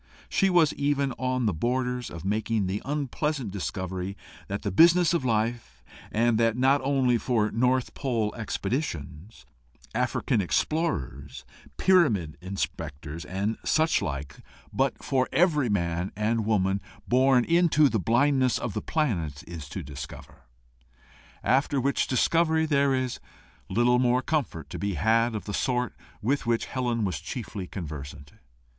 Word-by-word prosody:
She 195 - +2
was 175 -5 +4
even 140 -1 0
on 130 -1 0
the 105 - +2
borders 125 +6 -1
of 85 0 -8
making 110 +1 0
the 95 +3 -2
unpleasant 145 -3 -2
discovery 95 0 -4 0.3
that 100 +1 -4
the 100 - -1
business 170 - +5
of 170 - +1
life 115 0 -1 0.3
and 115 0 +2
that 115 0 +2
not 135 +3 +3
only 130 -3 +2
for 110 -4 +1
North 125 +2 +1
Pole 115 -6 -1
expeditions, 100 - -4 0.5
African 105 - 0
explorers, 100 - -2 0.3
pyramid 115 - +3
inspectors, 85 -4 -5
and 100 +4 -2
such 160 0 +2
like, 70 -1 -4 0.4
but 135 -1 0
for 130 -2 +1
every 150 -4 +3
man 85 -2 -1
and 110 +1 0
woman 95 -2 +1 0.3
born 130 0 +4
into 170 -3 +4
the 115 -4 0
blindness 130 - +2
of 120 - -4
the - - -2
planet 85 - -1
is 80 -4 -8
to 95 - -5
discover; 70 0 -10 1.0
after 135 +2 +2
which 140 +2 +1
discovery 160 +4 +2
there 140 -3 +2
is 130 -1 -2 0.5
little 125 +1 +3
more 125 0 +2
comfort 130 - -2
to - - -5
be 100 -2 -2
had 115 +7 +2
of 105 - -5
the 105 - -5
sort 125 -1 0 0.3
with 135 +2 0
which 115 -1 +1
Helen 120 -4 -1
was 90 -8 -2
chiefly 100 - -6
conversant. 75 -5 -8
120 Hz, 140 wpm, -27 LUFS, 95-135 Hz, 1.0 s, business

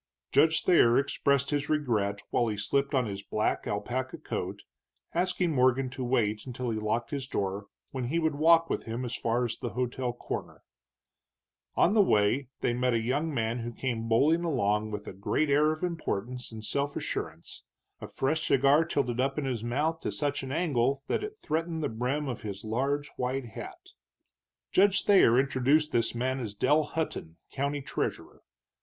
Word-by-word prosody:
Judge 155 +2 +4
Thayer 125 -9 +5
expressed 140 0 +1
his 145 0 -1
regret 110 -9 0
while 120 - +2
he 105 -2 -2
slipped 140 +8 0
on 130 -2 +2
his 100 -2 -5
black 105 +2 -1
alpaca 130 +5 -3
coat, - - -5 0.5
asking 180 0 +1
Morgan 130 0 +2
to 130 0 -5
wait 110 -3 0
until 125 -1 -3
he 110 - -2
locked 110 +2 -1
his 140 -3 -3
door, 100 -3 -3 0.2
when 130 -2 -3
he 145 +8 -1
would 160 -2 +1
walk 165 +3 +5
with - - -3
him 115 +3 -3
as 120 0 -3
far 120 +2 0
as 120 - -4
the - - -4
hotel 125 0 -1
corner. 120 - -6 1.1
On 185 - +4
the 215 - +6
way 120 - +2
they 120 - +1
met 125 0 +1
a - - +2
young 140 +8 -1
man 115 -3 -1
who 120 0 -4
came 115 -2 -3
bowling 150 +9 +3
along 110 -9 +1
with 105 -1 -5
a - - -6
great 120 +10 0
air 150 +2 +4
of 155 +2 -5
importance 125 - -3
and 110 -1 -7
self 140 +3 -1
assurance, 80 +2 -5 0.4
a - - -7
fresh 155 +4 -1
cigar 140 +4 +5
tilted 130 -7 -1
up 135 +2 0
in 150 - -1
his 120 -4 -2
mouth 150 +7 -1
to - - -2
such 145 -1 -1
an 135 -1 -6
angle 135 -4 +1
that - - -1
it 425 +1 -6
threatened 160 - -2
the 145 - 0
brim 125 +6 -2
of 125 -4 -4
his 100 -2 -6
large 140 +6 -1
white 130 +1 -2
hat. 110 - -8 0.9
Judge 200 +1 +4
Thayer 160 - +6
introduced 140 +3 +2
this 115 0 +1
man 130 +2 -1
as 110 -5 -5
Dell 150 +8 +3
Hutton, 145 - -4
county 140 +1 -2
treasurer. - - -4
130 Hz, 180 wpm, -29 LUFS, 115-150 Hz, 1.1 s, the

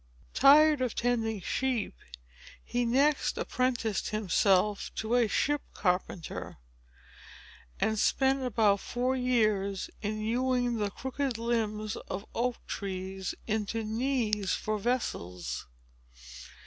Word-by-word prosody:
Tired 295 +1 +6
of 250 -3 -1
tending 225 -4 0
sheep, 250 - -1 0.7
he 245 0 0
next 275 +5 +2
apprenticed 245 -5 -1
himself 200 -1 +2
to 220 +2 -2
a 245 -2 +4
ship 290 +6 +1
carpenter, 180 -2 -2 1.2
and 220 -1 +1
spent 270 +3 +2
about 220 -5 +2
four 250 +4 -1
years 215 -6 +1
in 215 +1 -2
hewing 245 +2 0
the 205 -1 0
crooked 265 +2 -3
limbs 215 -2 -1
of 195 +3 -5
oak 245 +1 0
trees 190 -1 -4
into 220 +1 -1
knees 220 -3 0
for 215 0 -2
vessels. 90 - -3
225 Hz, 105 wpm, -30 LUFS, 205-250 Hz, 1.2 s, Tired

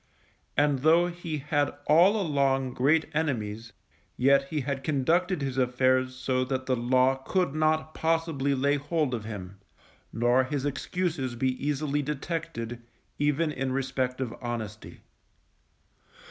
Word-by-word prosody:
And 145 -2 +3
though 165 +5 +4
he 170 -3 -5
had 145 0 0
all 180 +8 +5
along 135 -6 +1
great 150 +5 +3
enemies, 115 -7 -2 0.5
yet 135 +2 +4
he 150 0 -2
had 135 0 -3
conducted 160 +4 +1
his 135 -1 -2
affairs 130 0 +2
so 130 0 0
that 130 0 -3
the 130 - +1
Law 130 +2 +2
could 160 +3 -1
not 155 0 +1
possibly 160 -4 0
lay 140 +2 +2
hold 145 -1 -1
of 110 -3 -3
him, 100 -3 -7 0.5
nor 120 +3 +3
his 140 0 -3
excuses 145 -3 -2
be 130 +2 +1
easily 145 0 0
detected, 140 -5 -4 0.4
even 150 +2 +1
in 135 -2 -2
respect 130 -1 -1
of 125 -3 -3
honesty. 110 -3 -6
135 Hz, 130 wpm, -27 LUFS, 130-155 Hz, 0.5 s, all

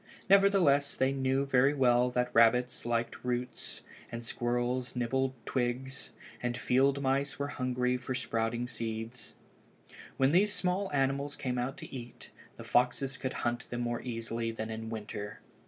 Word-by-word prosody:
Nevertheless 190 -8 +5
they 130 +1 +2
knew 135 0 +1
very 135 +1 +4
well 125 -2 +4
that 125 0 -1
rabbits 120 +1 +4
liked 115 0 -1
roots, 125 0 -3 0.3
and 115 0 -5
squirrels 120 +2 -1
nibbled 130 +2 0
twigs, 130 +1 -2 0.3
and 120 0 -1
field 135 +3 +2
mice 135 +1 +1
were 140 0 -2
hungry 125 -2 0
for 125 +1 -4
the 130 - -1
sprouting 115 +1 -1
seeds. 115 0 -5 0.8
When 135 +1 +4
these 200 +5 +4
small 185 +1 0
animals 140 +1 0
came 125 -2 -2
out 125 +2 -2
to - - -8
eat, 120 -1 -9 0.2
the - - -9
foxes 125 +2 +1
could 130 +1 -3
hunt 120 +1 -1
them 120 0 -3
more 120 0 -1
easily 115 -1 -3
than 110 0 -5
in 110 0 -5
winter. 105 -2 -6
125 Hz, 155 wpm, -31 LUFS, 120-135 Hz, 0.8 s, Nevertheless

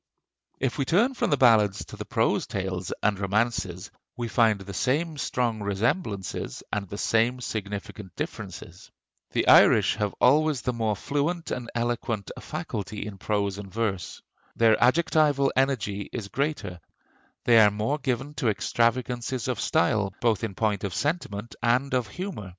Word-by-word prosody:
If 130 +2 -1
we 135 - +1
turn 215 - +3
from - - -1
the 145 - +2
ballads 110 -6 +4
to - - -10
the - - -7
prose - - +1
tales 95 -2 -3
and 100 -2 +2
romances, 100 -3 -1 0.3
we 120 -1 -3
find 110 -3 +3
the 100 0 -8
same 150 - 0
strong 120 -5 -1
resemblances 100 - -2
and 100 -2 -2
the 100 - -6
same 115 +4 +1
significant 105 -3 -6
differences. - - -7 0.4
The - - -1
Irish - - +6
have 105 -2 -1
always 150 +1 +3
the 125 - 0
more 110 -2 0
fluent 145 - -2
and 120 -2 -4
eloquent 120 -3 -2
a - - -9
faculty 105 0 -5
in 100 -2 -8
prose 100 -1 -1
and 100 -2 -9
verse. 105 -5 -3 0.3
Their 115 -1 +5
adjectival 145 -1 +3
energy 110 -7 0
is 105 -5 -5
greater; 110 - -2 0.7
they 115 -2 +7
are 105 -1 +7
more 110 +8 -1
given 135 +1 -2
to 120 - +1
extravagances 120 +2 0
of - - -2
style, 100 +2 +1
both 115 -4 +1
in 105 -4 -3
point 105 -2 0
of 100 -4 -3
sentiment 120 -9 -2
and 125 +4 +1
of 125 -3 +1
humor. 180 - -6
115 Hz, 155 wpm, -26 LUFS, 100-130 Hz, 0.7 s, they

